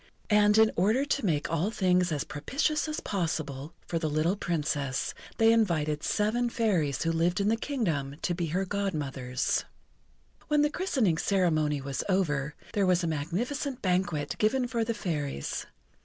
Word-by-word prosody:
And 210 Hz, 0 st, +5 dB
in 220 Hz, 0 st, +6 dB
order 215 Hz, +10 st, +2 dB
to 280 Hz, -4 st, -1 dB
make 150 Hz, -3 st, 0 dB
all 165 Hz, +5 st, +1 dB
things 180 Hz, -4 st, +2 dB
as 145 Hz, -4 st, -1 dB
propitious 285 Hz, -, -1 dB
as 305 Hz, 0 st, -3 dB
possible 160 Hz, -5 st, -3 dB
for 165 Hz, -, -2 dB
the 160 Hz, -1 st, -1 dB
little 155 Hz, +5 st, +1 dB
Princess, 150 Hz, -7 st, -1 dB, 0.2 s
they 225 Hz, 0 st, +5 dB
invited 155 Hz, -9 st, +1 dB
seven 230 Hz, +7 st, +1 dB
Fairies 180 Hz, -, 0 dB
who 165 Hz, -, +1 dB
lived 170 Hz, +2 st, +1 dB
in 200 Hz, +1 st, +2 dB
the 225 Hz, -, +3 dB
Kingdom, 170 Hz, -, -2 dB
to 175 Hz, -, +1 dB
be 170 Hz, -1 st, -2 dB
her 180 Hz, +5 st, -1 dB
Godmothers. 145 Hz, -11 st, -1 dB, 0.8 s
When 295 Hz, -1 st, +3 dB
the 295 Hz, -, +2 dB
christening 255 Hz, -, +1 dB
ceremony 155 Hz, -7 st, +1 dB
was 135 Hz, -1 st, -3 dB
over, 150 Hz, -7 st, 0 dB, 0.2 s
there 200 Hz, -2 st, +2 dB
was 180 Hz, -1 st, +3 dB
a -, -, 0 dB
magnificent 235 Hz, -, -2 dB
banquet 180 Hz, -5 st, 0 dB
given 245 Hz, +4 st, +2 dB
for 230 Hz, -1 st, 0 dB
the 230 Hz, 0 st, -2 dB
Fairies. 150 Hz, -, -3 dB
180 Hz, 160 wpm, -29 LUFS, 150-220 Hz, 0.8 s, in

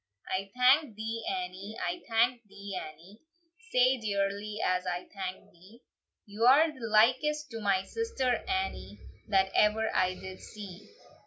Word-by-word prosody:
"I 195 Hz, +1 st, -3 dB
thank 255 Hz, 0 st, +4 dB
thee, 225 Hz, +1 st, -4 dB
Annie; 225 Hz, -, -5 dB
I 175 Hz, 0 st, -3 dB
thank 235 Hz, +2 st, +2 dB
thee, 200 Hz, 0 st, -8 dB
Annie, 170 Hz, +6 st, -9 dB, 0.5 s
Sae 255 Hz, +1 st, +4 dB
dearly 205 Hz, 0 st, -2 dB
as 185 Hz, 0 st, 0 dB
I 180 Hz, 0 st, -3 dB
thank 190 Hz, -2 st, -6 dB
thee; 190 Hz, +8 st, -19 dB, 0.4 s
You're 250 Hz, +9 st, +4 dB
the 260 Hz, -6 st, -7 dB
likest 260 Hz, +7 st, +3 dB
to 225 Hz, -1 st, -6 dB
my 195 Hz, -2 st, +2 dB
sister 270 Hz, -, -1 dB
Annie, 380 Hz, 0 st, -3 dB, 0.3 s
That 190 Hz, -2 st, +2 dB
ever 220 Hz, +1 st, +3 dB
I 185 Hz, 0 st, +2 dB
did 190 Hz, 0 st, -9 dB
see. 205 Hz, -2 st, -10 dB
215 Hz, 140 wpm, -30 LUFS, 190-250 Hz, 0.5 s, thank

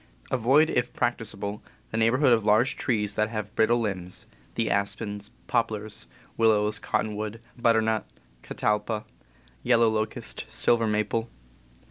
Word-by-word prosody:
Avoid, 135 Hz, +6 st, +4 dB
if 120 Hz, 0 st, 0 dB
practicable, 110 Hz, -4 st, -2 dB, 0.3 s
the 110 Hz, -, -2 dB
neighborhood 125 Hz, +4 st, +4 dB
of 110 Hz, -2 st, +2 dB
large 110 Hz, +5 st, +3 dB
trees 105 Hz, -5 st, 0 dB
that 110 Hz, +1 st, +1 dB
have 110 Hz, -2 st, -5 dB
brittle 120 Hz, +2 st, +3 dB
limbs 95 Hz, -5 st, -3 dB, 0.3 s
(the 115 Hz, -, 0 dB
aspens, 100 Hz, +1 st, -2 dB, 0.2 s
poplars, 110 Hz, -2 st, -2 dB, 0.3 s
willows, 110 Hz, -2 st, +3 dB
cottonwood, 110 Hz, +1 st, -2 dB, 0.2 s
butternut, 110 Hz, -2 st, +2 dB, 0.3 s
catalpa, 105 Hz, -, -1 dB, 0.6 s
yellow 115 Hz, -2 st, +4 dB
locust, 110 Hz, 0 st, -2 dB
silver 115 Hz, -1 st, +2 dB
maple). 105 Hz, +2 st, 0 dB
110 Hz, 115 wpm, -26 LUFS, 105-115 Hz, 0.6 s, Avoid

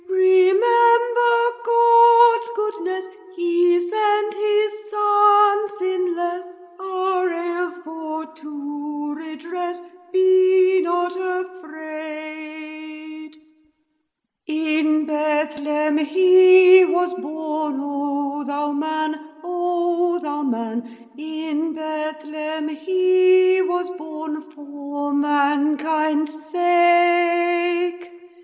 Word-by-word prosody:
Remember 470 Hz, +6 st, +3 dB, 0.3 s
God's 470 Hz, 0 st, +5 dB
goodnesse; 380 Hz, -3 st, -4 dB, 0.3 s
He 350 Hz, 0 st, +2 dB
sent 420 Hz, +3 st, -1 dB
His 420 Hz, 0 st, 0 dB, 0.2 s
Son 415 Hz, 0 st, +3 dB
sinlesse 355 Hz, -1 st, -3 dB, 0.2 s
Our 375 Hz, -1 st, -2 dB
ails 345 Hz, +1 st, -4 dB
for 320 Hz, 0 st, -7 dB
to 295 Hz, -1 st, -8 dB
redress; 335 Hz, +3 st, -7 dB, 0.3 s
Be 375 Hz, 0 st, +4 dB
not 350 Hz, 0 st, -2 dB
afraid! 310 Hz, -3 st, -9 dB, 1.1 s
In 310 Hz, -1 st, 0 dB
Bethlehem 300 Hz, 0 st, -1 dB
He 370 Hz, +3 st, +6 dB
was 360 Hz, 0 st, 0 dB
born, 310 Hz, -3 st, -5 dB
O 285 Hz, 0 st, -4 dB
thou 290 Hz, +1 st, -3 dB
Man: 310 Hz, +1 st, -4 dB, 1.9 s
In 315 Hz, +1 st, -5 dB
Bethlehem 310 Hz, 0 st, -6 dB
He 370 Hz, +3 st, +2 dB
was 360 Hz, -1 st, -2 dB
born, 310 Hz, 0 st, -7 dB
For 285 Hz, -1 st, -7 dB
mankind's 295 Hz, +2 st, 0 dB, 0.2 s
sake. 350 Hz, 0 st, +1 dB
345 Hz, 70 wpm, -20 LUFS, 310-370 Hz, 1.9 s, He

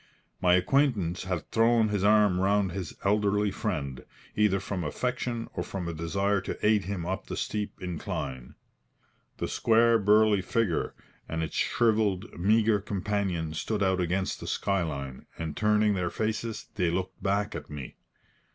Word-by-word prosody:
My 90 Hz, -1 st, +5 dB
acquaintance 95 Hz, -, +1 dB
had 90 Hz, -3 st, -3 dB
thrown 115 Hz, -1 st, +4 dB
his 105 Hz, -2 st, -1 dB
arm 105 Hz, -3 st, +4 dB
round 100 Hz, 0 st, +2 dB
his 90 Hz, -2 st, -5 dB
elderly 105 Hz, 0 st, +2 dB
friend, 70 Hz, -, -3 dB, 0.3 s
either 105 Hz, -2 st, +3 dB
from 95 Hz, -1 st, -4 dB
affection 120 Hz, +6 st, -2 dB
or -, -, -3 dB
from 90 Hz, -3 st, -4 dB
a 85 Hz, -, -3 dB
desire 100 Hz, +5 st, 0 dB
to -, -, -5 dB
aid 105 Hz, -3 st, +3 dB
him 95 Hz, -3 st, -3 dB
up 95 Hz, +2 st, -3 dB
the -, -, -5 dB
steep 105 Hz, -1 st, -3 dB
incline. 70 Hz, -8 st, -5 dB, 0.8 s
The -, -, -2 dB
square 115 Hz, 0 st, +4 dB
burly 105 Hz, 0 st, +4 dB
figure 95 Hz, -2 st, 0 dB, 0.3 s
and 80 Hz, 0 st, -2 dB
its 80 Hz, -, -5 dB
shrivelled, 110 Hz, -3 st, +1 dB
meagre 110 Hz, +3 st, +3 dB
companion 95 Hz, -5 st, -2 dB
stood 100 Hz, +6 st, -1 dB
out 95 Hz, -1 st, +2 dB
against 95 Hz, +2 st, -1 dB
the -, -, -7 dB
sky 100 Hz, -1 st, 0 dB
line, 70 Hz, -5 st, -5 dB
and 80 Hz, -3 st, -4 dB
turning 105 Hz, 0 st, +3 dB
their 90 Hz, -3 st, -1 dB
faces, 110 Hz, +3 st, -3 dB
they 90 Hz, -6 st, +1 dB
looked 90 Hz, +2 st, -3 dB
back 100 Hz, +1 st, 0 dB
at 75 Hz, -, -7 dB
me. 70 Hz, -4 st, -8 dB
100 Hz, 155 wpm, -28 LUFS, 90-105 Hz, 0.8 s, My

